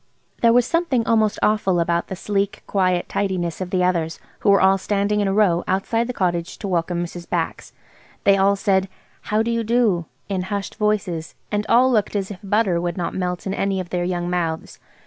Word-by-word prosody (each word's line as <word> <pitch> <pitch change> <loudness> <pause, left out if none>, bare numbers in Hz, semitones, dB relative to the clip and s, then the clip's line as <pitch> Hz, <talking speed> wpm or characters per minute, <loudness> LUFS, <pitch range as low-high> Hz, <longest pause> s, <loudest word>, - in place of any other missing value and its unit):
There 230 - +6
was 245 0 +4
something 310 -9 +1
almost 220 -2 +2
awful 195 -4 +2
about 170 0 0
the 190 - -5
sleek, 200 +2 -2
quiet 185 -3 +1
tidiness 185 -4 -2
of 185 - -3
the 180 -1 +1
others, 170 -3 0 0.2
who - - +1
were 200 -1 +6
all 195 0 +4
standing 205 +1 0
in 205 - +1
a - - +1
row 190 -5 +3
outside 225 +5 0
the - - -2
cottage 175 -6 -2
to 205 - -5
welcome 175 -1 -1
Mrs. 175 0 -8
Bax. - - -2 0.5
They 200 - +5
all 195 +1 +3
said, 195 -1 +1 0.4
"How 215 +1 +2
do 235 - -1
you 230 0 0
do?" 220 -7 +2 0.2
in 195 -2 -1
hushed 200 -1 -3
voices, 205 -6 -1 0.2
and 210 0 -1
all 250 +3 +5
looked 215 -3 +1
as 195 0 -2
if 195 - -8
butter 200 -4 +1
would 175 0 -3
not 175 - -2
melt 180 -1 -3
in 190 - -2
any 195 -1 -1
of 180 -2 -6
their 180 -1 0
young 175 -1 -2
mouths. 170 -3 -3
195 Hz, 205 wpm, -22 LUFS, 175-210 Hz, 0.5 s, There